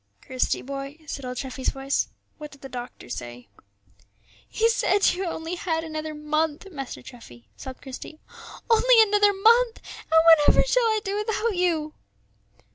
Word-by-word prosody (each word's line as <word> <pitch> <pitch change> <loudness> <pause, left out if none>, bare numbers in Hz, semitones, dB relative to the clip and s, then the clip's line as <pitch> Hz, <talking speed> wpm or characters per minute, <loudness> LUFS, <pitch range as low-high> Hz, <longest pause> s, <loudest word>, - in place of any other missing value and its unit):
"Christie, 255 -1 -1
boy," 275 +2 -6
said 275 -2 -6
old 250 0 -5
Treffy's 260 0 -3
voice; 270 +1 -1 0.3
"what 300 -1 -8
did 280 -1 -17
the 270 - -9
doctor 245 0 -8
say?" 120 -2 -8 1.0
"He 450 - +2
said 460 -4 +2
you 375 +2 -3
had 340 - -2
only 330 +2 -5
another 315 -2 -3
month, 300 +2 -1
Master 275 -5 -7
Treffy," 120 - -14
sobbed 260 -1 -10
Christie, 270 +3 -9 0.5
"only 470 0 +6
another 415 -1 +3
month; 455 +4 +3 0.2
and 320 0 +3
whatever 325 -3 +6
shall - - +2
I 435 -1 +1
do 395 0 -3
without 435 0 -1
you?" 325 -4 0
315 Hz, 150 wpm, -25 LUFS, 270-410 Hz, 1.0 s, only